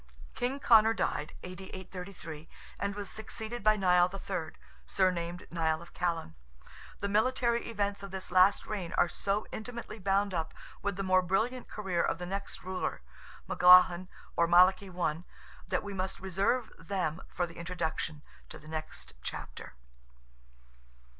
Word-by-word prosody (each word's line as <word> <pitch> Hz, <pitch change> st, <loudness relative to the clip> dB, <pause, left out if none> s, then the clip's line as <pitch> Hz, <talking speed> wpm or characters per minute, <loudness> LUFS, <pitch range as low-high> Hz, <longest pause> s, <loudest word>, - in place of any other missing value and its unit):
King 255 Hz, +3 st, -2 dB
Conor 225 Hz, -3 st, +6 dB
died 150 Hz, -, -1 dB
(A.D. 185 Hz, +1 st, -7 dB
833), 180 Hz, -4 st, -8 dB, 0.3 s
and 200 Hz, 0 st, -2 dB
was 205 Hz, -1 st, -5 dB
succeeded 220 Hz, +2 st, -5 dB
by 215 Hz, 0 st, +5 dB
Nial 180 Hz, -2 st, +4 dB
III., 190 Hz, -4 st, -4 dB, 0.3 s
surnamed 175 Hz, -2 st, 0 dB
Nial 160 Hz, -2 st, +1 dB
of 170 Hz, -, -13 dB
Callan. 170 Hz, -, -2 dB, 0.7 s
The 200 Hz, -, 0 dB
military 235 Hz, +3 st, +2 dB
events 205 Hz, -3 st, -1 dB
of 200 Hz, -, -7 dB
this 190 Hz, -1 st, -6 dB
last 185 Hz, +2 st, +5 dB
reign 195 Hz, -6 st, -4 dB
are -, -, +4 dB
so 200 Hz, +4 st, -1 dB
intimately 230 Hz, -1 st, -6 dB
bound 200 Hz, +1 st, +1 dB
up 160 Hz, -2 st, -2 dB, 0.3 s
with 200 Hz, -1 st, -1 dB
the 195 Hz, -, -3 dB
more 185 Hz, -1 st, +4 dB
brilliant 220 Hz, +8 st, 0 dB
career 190 Hz, -5 st, -1 dB
of -, -, 0 dB
the 180 Hz, -, -5 dB
next 195 Hz, +2 st, -5 dB
ruler—Melaghlin, 180 Hz, -1 st, +3 dB, 0.3 s
or 170 Hz, -, +3 dB
Malachy 185 Hz, +3 st, +5 dB
I.—that 175 Hz, -2 st, -4 dB
we 205 Hz, -1 st, -5 dB
must 190 Hz, 0 st, -3 dB
reserve 195 Hz, +6 st, 0 dB
them 170 Hz, -1 st, -2 dB
for 175 Hz, -, -1 dB
the 165 Hz, -1 st, -12 dB
introduction 165 Hz, -3 st, -3 dB, 0.3 s
to -, -, -9 dB
the -, -, -15 dB
next 155 Hz, 0 st, -6 dB
chapter. -, -, -7 dB
185 Hz, 140 wpm, -31 LUFS, 175-200 Hz, 0.7 s, Conor